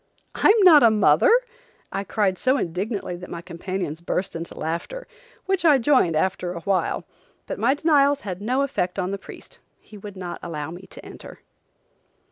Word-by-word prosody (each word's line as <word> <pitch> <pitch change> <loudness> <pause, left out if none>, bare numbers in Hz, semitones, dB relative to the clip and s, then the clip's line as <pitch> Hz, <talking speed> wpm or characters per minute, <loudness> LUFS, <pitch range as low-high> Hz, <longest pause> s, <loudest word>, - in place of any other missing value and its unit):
"I'm 430 +2 +4
not 325 -6 +8
a 230 - +7
mother!" 220 - +4 0.6
I 195 - -3
cried 200 -2 0
so 260 +8 +1
indignantly 190 0 -3
that 180 +1 -10
my 170 0 -7
companions 170 -2 -5
burst 180 +2 -3
into 165 0 -7
laughter, 170 - -4 0.4
which 385 -2 0
I 305 -4 +6
joined 255 - +2
after 180 +1 -1
a 170 - -7
while, 195 +1 -1 0.4
but - - -6
my 255 +5 +2
denials 285 -2 +3
had 185 -2 -6
no 255 +6 0
effect 185 -10 -2
on 185 0 -2
the 200 - -4
priest. - - -13 0.2
He 210 - -14
would 200 -1 -10
not 180 -2 -6
allow 155 -2 -5
me 180 +3 -11
to - - -13
enter. - - -12
195 Hz, 175 wpm, -23 LUFS, 175-265 Hz, 0.6 s, not